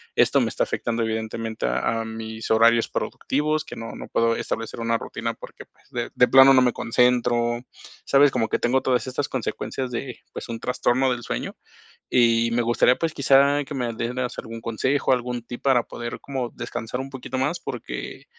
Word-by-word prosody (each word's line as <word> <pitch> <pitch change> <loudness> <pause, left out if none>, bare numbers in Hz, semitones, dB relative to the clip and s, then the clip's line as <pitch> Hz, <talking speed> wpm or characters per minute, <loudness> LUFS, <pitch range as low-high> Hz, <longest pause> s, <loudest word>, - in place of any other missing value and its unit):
esto - - +4
me - - +1
está - - 0
afectando 115 -1 -2
evidentemente 110 0 -3
a 115 0 0
a - - -5
mis 110 0 -6
horarios 115 +1 +4
productivos, 155 +2 -1
que - - -8
no 115 0 -7
no - - -8
puedo 115 0 +2
establecer 115 +1 -4
una 115 0 +1
rutina - - -4
porque, - - -11
pues, - - -30
de - - -2
de 125 - +7
plano 135 0 +8
no 130 - +6
me 125 - +2
concentro, 120 0 +2 0.4
¿sabes?, 140 0 +5
como 115 -3 0
que - - 0
tengo 125 +2 +2
todas 125 -2 0
estas 135 +2 -2
consecuencias 130 0 -3
de, 125 0 -5
pues, - - -7
un 115 - -4
trastorno 125 +1 +1
del 120 -1 -2
sueño, - - -3 0.6
y 115 -1 +4
me 120 +1 +2
gustaría, 120 +2 +3
pues, 165 -1 -1
quizás 140 +1 +4
que 145 - -7
me 120 -3 -2
dieras 125 +2 -3
algún 115 0 -7
consejo, 130 +5 0
algún 125 -1 -1
tip, 120 - -8
para 130 -4 +3
poder 120 0 -6
como 130 -4 -4
descansar 115 +3 -5
un 135 +1 -6
poquito 130 -1 -5
más 145 +7 0
porque - - -6
120 Hz, 190 wpm, -24 LUFS, 115-130 Hz, 0.6 s, plano